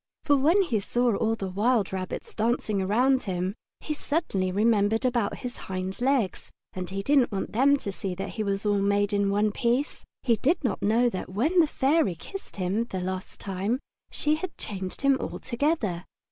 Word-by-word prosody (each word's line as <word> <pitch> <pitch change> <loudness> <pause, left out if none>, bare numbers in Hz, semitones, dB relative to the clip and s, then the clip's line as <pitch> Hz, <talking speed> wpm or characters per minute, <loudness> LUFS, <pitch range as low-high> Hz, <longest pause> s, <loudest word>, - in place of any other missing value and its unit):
For 290 - +4
when 325 +9 +4
he 240 - 0
saw 240 +2 +1
all 225 +2 +1
the 195 -4 -4
wild 210 0 +1
rabbits 185 -1 -5
dancing 220 -3 0
around 250 +7 +3
him 185 +1 -1 0.3
he 305 - -3
suddenly 285 - -1
remembered 220 +3 +2
about 240 -5 +1
his 245 - -5
hind 190 +3 -4
legs, 255 -7 0 0.2
and 185 -1 -5
he 195 +1 -3
didn't 275 0 +3
want 195 - -3
them 275 +6 +4
to 205 - -5
see 190 -1 -4
that 195 - -4
he 220 - -3
was 200 0 -1
made 205 0 +2
all 200 - +2
in 200 - +2
one 205 +1 +2
piece. 245 +6 0 0.2
He 235 -3 +3
did 305 - +1
not 245 - -1
know 230 +4 +3
that 185 - -5
when 280 - +2
the 320 - +6
Fairy 275 - +2
kissed 390 - -9
him 195 +4 0
that 190 -6 -4
last 185 0 -5
time 200 +6 -2 0.3
she 300 - 0
had 370 +2 -6
changed 190 -3 -5
him 275 -1 +4
altogether. 235 - -1
215 Hz, 190 wpm, -27 LUFS, 195-265 Hz, 0.3 s, the